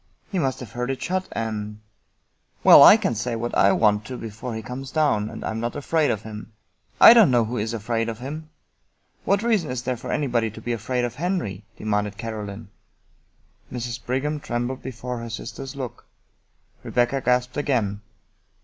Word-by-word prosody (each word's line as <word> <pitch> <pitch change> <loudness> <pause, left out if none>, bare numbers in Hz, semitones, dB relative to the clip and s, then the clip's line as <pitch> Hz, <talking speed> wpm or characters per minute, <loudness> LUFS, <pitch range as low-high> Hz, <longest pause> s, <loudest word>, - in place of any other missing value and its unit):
" - - -37
He 190 - 0
must 135 -4 -1
have 125 - -8
heard 125 +1 -3
it 135 - -2
shut, 185 +1 -2
and 105 -2 -4 0.3
" - - -47
" - - -41
Well, - - +10
I - - +10
can - - -1
say 115 +2 -2
what 120 +1 -3
I 100 - +5
want 105 -1 +3
to 125 +1 -6
before 115 +2 -6
he 110 - -5
comes 130 +3 -6
down, 130 -9 +1
and - - -7
I - - -2
am 110 - -4
not 120 +1 -3
afraid 150 +1 +1
of 110 0 -1
him." 110 0 -9 0.5
"I - - +11
don't 225 -8 +7
know 120 -3 +3
who 120 +3 -4
is 110 +1 -2
afraid 115 +1 -2
of 115 - -5
him! 150 +6 -7 0.8
What 200 +2 +2
reason 215 -9 +1
is 125 -1 -3
there 130 -1 -1
for 115 - -7
anybody 120 -6 0
to 110 - -11
be 120 +2 -3
afraid 120 +2 -1
of 120 - -4
Henry? 140 - -3
" - - -36
demanded 105 -1 -1
Caro 110 -2 -5
line. 100 +1 -9 1.0
Mrs. 120 -1 -5
Brigham 145 +5 -1
trembled 120 0 -3
before 125 -1 -5
her 115 0 -6
sister's 125 +4 -7
look. 130 -3 -6 0.8
Rebecca 125 +2 0
gasped 125 0 +1
again. 115 -9 0
120 Hz, 200 wpm, -24 LUFS, 110-135 Hz, 1.0 s, I